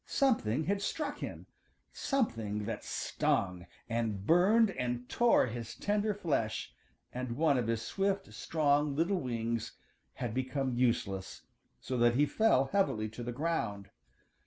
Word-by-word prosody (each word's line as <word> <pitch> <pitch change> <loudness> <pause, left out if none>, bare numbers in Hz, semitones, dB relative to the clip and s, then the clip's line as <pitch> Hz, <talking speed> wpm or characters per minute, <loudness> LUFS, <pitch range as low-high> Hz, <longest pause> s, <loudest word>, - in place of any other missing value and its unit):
Something 160 - +2
had 200 +4 0
struck 290 +7 -3
him, - - -6 0.5
something 115 - -1
that - - -4
stung, 90 -2 -1 0.2
and 115 -4 -2
burned 200 - +5
and 125 -4 -3
tore 240 - +4
his 115 -1 -6
tender 210 0 0
flesh, 140 - -1 0.4
and 125 -1 -3
one 155 -2 +3
of 120 -3 0
his 115 0 -1
swift, 195 +5 -1
strong, 145 -2 +1
little 175 +5 +1
wings 115 -3 -2 0.4
had 120 -4 -4
become 130 +1 -1
useless, 115 -6 -1 0.4
so 125 -1 -3
that 120 0 +4
he 145 +3 +4
fell 145 -8 +3
heavily 110 - +1
to 110 +3 -9
the 120 0 -3
ground. 115 -9 -2
130 Hz, 135 wpm, -32 LUFS, 115-185 Hz, 0.5 s, burned